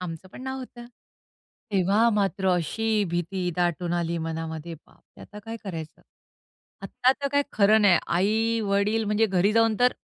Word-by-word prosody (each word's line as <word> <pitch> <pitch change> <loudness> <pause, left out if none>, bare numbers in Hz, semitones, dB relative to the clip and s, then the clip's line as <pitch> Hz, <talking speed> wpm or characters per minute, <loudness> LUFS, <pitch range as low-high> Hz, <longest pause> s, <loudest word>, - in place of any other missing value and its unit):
आमचं 180 +1 -7
पण 255 - -10
नाव 265 0 -4
होतं. 245 -2 -10 0.9
तेव्हा 200 +5 +3
मात्र 195 -2 0
अशी 210 +5 0
भीती 175 +1 -2
दाटून 175 0 -1
आली 170 -1 -1
मनामध्ये. 160 0 -5
बापरे! - - -21
आता 210 -1 -11
काय 225 - -5
करायचं? 165 -5 -7 0.8
आता 255 - +1
तर 280 - 0
काही 285 0 +2
खरं 215 +1 +4
नाही. 190 -4 +5
आई-वडील 210 +2 +1
म्हणजे 210 +2 +2
घरी 195 0 +2
जाऊन 225 -1 +3
तर 250 0 +4
200 Hz, 150 wpm, -25 LUFS, 175-225 Hz, 0.9 s, नाही